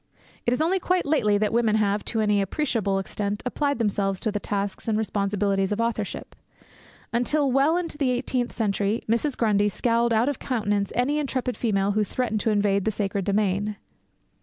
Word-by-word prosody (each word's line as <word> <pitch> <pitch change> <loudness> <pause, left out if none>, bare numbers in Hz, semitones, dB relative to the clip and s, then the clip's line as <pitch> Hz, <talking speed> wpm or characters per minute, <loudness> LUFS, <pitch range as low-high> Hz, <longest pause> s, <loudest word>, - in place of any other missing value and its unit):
It - - +4
is 290 - +1
only 370 +4 +1
quite 365 0 0
lately 215 -9 +2
that 210 +1 0
women 225 -2 +2
have, 205 -1 +1
to 225 - 0
any 210 -1 +2
appreciable 205 - 0
extent, 200 +1 -3
applied 285 +2 0
themselves 200 -4 0
to 220 - 0
the 205 - -2
tasks 200 0 -3
and 220 -1 +1
responsibilities 200 -2 0
of 210 - -1
authorship. 230 -3 -3 0.8
Until 270 +4 +2
well 280 +6 +3
into 335 -4 -4
the 275 -3 +2
eighteenth 250 0 -1
century, 210 0 -1
Mrs. 235 +5 0
Grundy 210 -2 +2
scowled 235 +3 +1
out 230 +2 +3
of 285 - -1
countenance 205 -5 -1
any 280 +5 +1
intrepid 255 -3 -2
female 200 -4 +1
who 210 +1 +1
threatened 220 0 -2
to 220 - 0
invade 200 -2 +1
the - - +2
sacred 200 -2 -2
domain. 205 0 0
215 Hz, 180 wpm, -25 LUFS, 205-250 Hz, 0.8 s, It